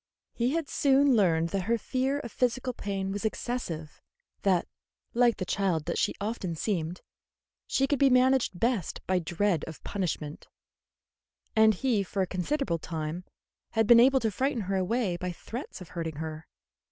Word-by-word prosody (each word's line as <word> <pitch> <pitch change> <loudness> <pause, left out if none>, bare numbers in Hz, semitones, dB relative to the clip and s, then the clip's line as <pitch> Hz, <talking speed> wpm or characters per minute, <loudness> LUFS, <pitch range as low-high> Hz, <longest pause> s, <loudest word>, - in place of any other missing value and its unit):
He 245 +3 0
had 330 -3 -1
soon 275 -1 +4
learned 170 -6 +3
that 190 +1 -2
her 235 +2 +2
fear 265 +4 -1
of 240 - -8
physical 250 +2 0
pain 195 -3 -3
was 205 +2 -4
excessive; 210 -9 -4 0.4
that, 185 -3 +2 0.5
like 240 -1 +4
the 185 - -3
child 180 -5 0
that 170 - -1
she - - +1
often 200 -5 -3
seemed, 175 -1 -2 0.7
she 270 - +2
could 275 -1 0
be 275 - +6
managed 255 -6 +3
best 230 -7 -1
by 185 -1 +2
dread 175 0 0
of 160 - -10
punishment; 160 -6 -3 1.1
and 220 -1 +6
he 235 -1 +1
for 195 0 -1
a - - 0
considerable 185 - -1
time 160 +2 -4 0.5
had 225 0 +3
been 235 +2 +8
able 265 +2 +6
to 220 - +1
frighten 260 +4 0
her 195 0 -2
away 190 0 0
by 180 0 -3
threats 230 +6 -7
of 180 - -10
hurting 165 -3 -4
her. 155 +1 -6
200 Hz, 165 wpm, -29 LUFS, 175-245 Hz, 1.1 s, been